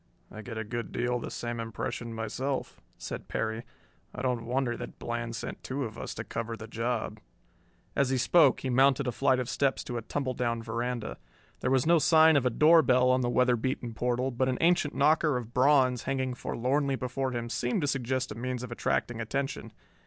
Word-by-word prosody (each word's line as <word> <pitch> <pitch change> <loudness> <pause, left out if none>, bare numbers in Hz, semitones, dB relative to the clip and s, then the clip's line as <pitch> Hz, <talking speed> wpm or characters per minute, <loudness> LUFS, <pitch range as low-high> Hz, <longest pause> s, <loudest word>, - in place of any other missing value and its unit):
"I 110 - -8
get 110 0 -7
a 110 - -2
good 115 +2 -5
deal 125 0 -1
the - - -6
same 120 -1 -4
impression 115 +1 -4
myself," 120 +5 -3 0.2
said - - -6
Perry. 110 0 -2 0.5
"I 125 - -5
don't 125 -3 -1
wonder 125 -1 0
that - - -8
Bland 120 0 -4
sent 110 - -6
two 135 +2 -3
of 110 -3 -5
us - - -5
to - - -4
cover 115 0 -4
the 110 - -8
job." 115 +1 -2 0.8
As 140 -2 +2
he 130 - +1
spoke 145 +2 +4
he 130 - -2
mounted 135 +1 +4
a 125 - 0
flight 130 +2 +2
of 125 -2 -2
steps 135 +1 0
to 120 - -4
a - - -3
tumbledown 120 -2 -2
veranda. 120 +1 -3 0.4
There 125 - -1
was 130 -1 +3
no 170 +1 +5
sign 160 0 +6
of 135 -3 +3
a - - +3
door 160 +7 +6
bell 125 -2 +4
on 130 0 +3
the 120 - 0
weather 125 0 +3
beaten 120 0 -3
portal, 125 +3 0
but 130 +2 0
an 125 - 0
ancient 170 -3 +2
knocker 155 -3 +3
of 120 -1 -7
bronze 130 -2 +4
hanging 130 -1 -1
forlornly 135 +3 -1
before 130 +1 -2
him 120 -1 -3
seemed 125 +7 -1
to 145 - 0
suggest 130 -1 -1
a - - -5
means 125 +1 -3
of 125 - -7
attracting 120 0 -1
attention. 135 0 -3
125 Hz, 205 wpm, -29 LUFS, 120-135 Hz, 0.8 s, sign